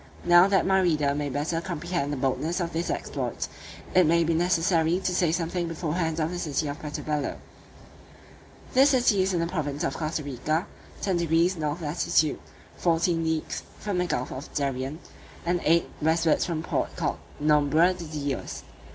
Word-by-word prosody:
Now, 175 +1 +7
that 195 -1 +3
my 190 0 +4
reader 150 -5 +2
may 145 0 -2
better 155 +5 -1
comprehend 170 -4 -3
the 145 - -2
boldness 145 +7 -1
of 170 -1 -2
this 165 +1 -2
exploit, - - -3 0.5
it 180 -3 +5
may 170 +1 +4
be 165 +1 +1
necessary 170 0 +2
to 185 - -1
say 175 -2 +2
something 170 +1 -1
beforehand 165 0 -2
of 160 +1 0
the 180 - -4
city 150 -2 -1
of 145 - -5
Puerto 150 -1 -5
Bello. 150 -2 -2 1.4
This 270 +3 +6
city 245 -7 +3
is 190 +1 +1
in 175 - 0
the 165 - +1
province 155 -3 -3
of - - -1
Costa 155 -1 -2
Rica, 145 +6 -1 0.4
10 190 -3 +1
deg. 170 +2 +2
north 150 +2 -2
latitude, 155 -1 +1 0.4
fourteen 165 0 +1
leagues 160 -1 -2 0.2
from 200 -4 -2
the 180 - 0
gulf 125 -6 -2
of 135 +3 -7
Darien, 135 0 -2 0.5
and 175 0 +1
eight 170 +1 +3
westwards 160 +1 +2
from 165 -3 -2
the - - -10
port - - -1
called - - -2 0.2
Nombre 150 +4 +4
de 180 -2 -8
Dios. 145 -4 -4
165 Hz, 175 wpm, -26 LUFS, 150-175 Hz, 1.4 s, Now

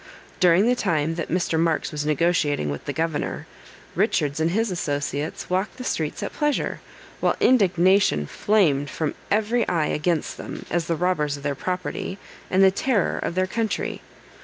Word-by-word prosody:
During 180 +2 +5
the 245 - +4
time 165 -8 0
that 165 -1 -4
Mr. 165 -2 0
Marks 165 -1 +1
was 150 0 -3
negotiating 150 - +1
with 70 - -6
the - - -2
governor, 160 0 -2 0.5
Richards 145 +1 +1
and 160 +1 +2
his 220 +4 0
associates 145 -2 -3
walked 185 +6 -1
the 255 - -6
streets 155 -10 -2
at - - -4
pleasure, 295 -1 -1 0.4
while - - +2
indignation 190 - +4
flamed 145 - +2
from 155 -2 -2 0.2
every 220 +3 +1
eye 165 -4 +1
against 155 +1 -1
them, - - -7
as 170 -1 0
the 165 - +1
robbers 155 -4 0
of 140 - -12
their 145 -1 0
property, 185 +4 -4 0.3
and 190 +1 +4
the 190 - +7
terror 205 0 0
of 170 - -3
their 185 0 +2
country. 220 +3 -2
170 Hz, 165 wpm, -24 LUFS, 150-190 Hz, 0.5 s, the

